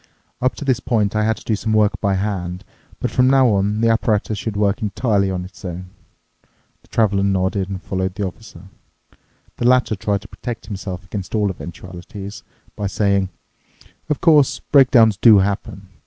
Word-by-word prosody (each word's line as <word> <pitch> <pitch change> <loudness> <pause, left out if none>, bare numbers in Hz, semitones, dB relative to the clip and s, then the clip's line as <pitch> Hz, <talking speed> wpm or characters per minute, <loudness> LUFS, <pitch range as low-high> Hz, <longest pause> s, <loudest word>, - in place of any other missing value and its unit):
"Up 130 +1 +1
to 145 - -7
this 130 -3 +2
point 110 -5 0
I 110 - +2
had 110 0 +1
to - - -13
do 110 - 0
some 110 +1 -2
work 105 -1 +2
by 100 -2 +1
hand, 95 -2 -3 0.4
but - - -2
from 125 0 +3
now 135 -2 +5
on 105 +1 +1
the 115 - +3
apparatus 110 -1 +1
should 105 -1 -4
work 100 +3 +1
entirely 105 -2 0
on 90 -1 -3
its 95 +1 -14
own." 90 0 -7 0.9
The - - -26
Traveler 100 -3 +1
nodded 95 0 0
and 95 -2 -6
followed 95 0 -2
the 100 - -2
Officer. 95 -2 -9 0.9
The 120 - +1
latter 125 -3 +3
tried 100 0 -1
to - - -11
protect 120 -2 -7
himself 95 -3 -6
against 100 +2 -5
all 105 -2 +1
eventualities 90 +3 -9 0.3
by 100 - -2
saying, 100 -1 +1 0.8
"Of 150 - -1
course, 150 -5 +4
breakdowns 125 -7 +6
do 110 -1 +7
happen. 100 0 -2
100 Hz, 175 wpm, -20 LUFS, 95-110 Hz, 0.9 s, do